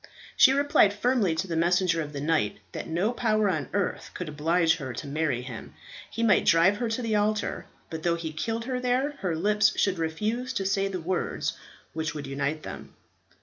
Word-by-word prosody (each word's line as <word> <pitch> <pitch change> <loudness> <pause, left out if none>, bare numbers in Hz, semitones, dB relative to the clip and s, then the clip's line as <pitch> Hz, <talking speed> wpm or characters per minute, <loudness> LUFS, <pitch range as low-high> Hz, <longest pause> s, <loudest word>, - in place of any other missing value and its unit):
She 260 - +7
replied 275 -7 +3
firmly 215 -6 +1
to 190 - -2
the 170 - -3
messenger 170 0 +2
of 150 -1 -5
the 140 -1 -5
knight 150 -9 +1
that - - -6
no 180 +8 0
power 215 -3 +1
on 155 -5 -3
earth 200 -1 -2
could 180 - -5
oblige 160 +3 +2
her 130 -4 -5
to - - -6
marry 140 -3 -1
him. 125 -4 -9 0.3
He 230 - -3
might 210 -4 +4
drive 170 +5 +5
her 235 0 -2
to 225 +2 -2
the 220 -2 0
altar; 210 0 0 0.2
but 160 -1 -5
though 170 +1 +1
he 165 -2 -5
killed 225 +8 -3
her 255 0 -2
there, 250 +3 +1
her 180 -4 -1
lips 210 +4 +2
should 190 -3 +1
refuse 215 +11 -2
to 195 -5 -2
say 195 +1 +1
the 190 -2 -4
words 180 +2 -2 0.4
which 160 0 -3
would 145 -2 -5
unite 140 +3 -2
them. - - -9
180 Hz, 200 wpm, -27 LUFS, 160-215 Hz, 0.4 s, She